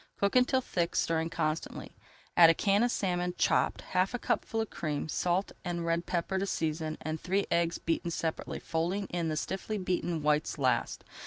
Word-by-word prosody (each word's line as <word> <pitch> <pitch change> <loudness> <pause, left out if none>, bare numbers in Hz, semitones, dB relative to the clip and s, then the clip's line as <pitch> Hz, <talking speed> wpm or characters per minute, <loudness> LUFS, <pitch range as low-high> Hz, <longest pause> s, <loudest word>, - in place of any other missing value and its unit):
Cook 200 +3 +1
until 255 +1 +4
thick, 170 -8 -1
stirring 165 0 +1
constantly. 160 -1 -3 0.4
Add 170 -2 +9
a 165 - +5
can 200 +3 +3
of 240 - +3
salmon, 180 -5 -1
chopped, - - +2
half 185 +6 0
a - - 0
cupful 225 -1 -1
of 225 - -2
cream, 150 -1 -3
salt 180 +4 0
and 175 -2 -3
red 170 +1 0
pepper 180 +2 -1
to 195 - -1
season 155 -2 -2
and 155 0 -4
three 195 +2 +1
eggs 170 0 +2
beaten 165 +1 -1
separately, 165 -1 -3
folding 175 +5 -1
in 170 -2 -1
the 155 - -1
stiffly 195 +6 -3
beaten 175 -4 -1
whites 150 +1 +1
last. 130 -4 0
170 Hz, 180 wpm, -30 LUFS, 160-190 Hz, 0.4 s, Add